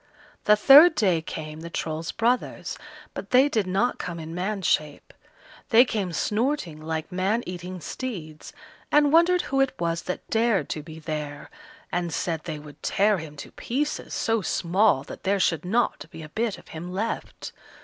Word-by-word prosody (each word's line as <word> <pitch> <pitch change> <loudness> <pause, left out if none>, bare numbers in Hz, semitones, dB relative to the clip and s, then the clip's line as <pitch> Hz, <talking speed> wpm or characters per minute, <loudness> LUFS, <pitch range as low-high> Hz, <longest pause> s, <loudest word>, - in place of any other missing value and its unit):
The 210 - +7
third 290 +10 +8
day 185 - +2
came 155 -1 -7
the 170 +1 -7
Troll's 160 0 -3
brothers, 240 +2 -1 0.4
but - - -7
they 255 +3 +6
did 215 -9 0
not 195 +7 0
come 170 -2 -5
in 160 0 -7
man's 190 +2 -3
shape. 150 -2 -1 0.6
They 240 +2 +7
came 205 -7 -2
snorting 210 - -1
like 160 +2 -4
man 195 +6 0
eating 180 +1 -6
steeds, 160 -10 -6 0.4
and 295 0 +4
wondered 350 +2 +5
who 270 0 0
it 270 -1 +1
was 170 0 -1
that 180 - -4
dared 225 -3 +2
to 155 - -3
be 155 +1 -11
there, 150 -2 -5 0.4
and 175 -1 -1
said 165 +1 -2
they 160 -3 -4
would 150 -1 -13
tear 205 -1 +2
him 155 -2 -9
to 140 - -9
pieces, 290 +5 -3
so 225 -1 +1
small 185 -4 +2
that - - -10
there 200 +1 +1
should 165 -3 +1
not 230 +6 0
be 160 - -10
a 155 - -10
bit 220 +4 -2
of - - -17
him 170 +3 -7
left. 210 +5 -4
185 Hz, 175 wpm, -25 LUFS, 160-230 Hz, 0.6 s, third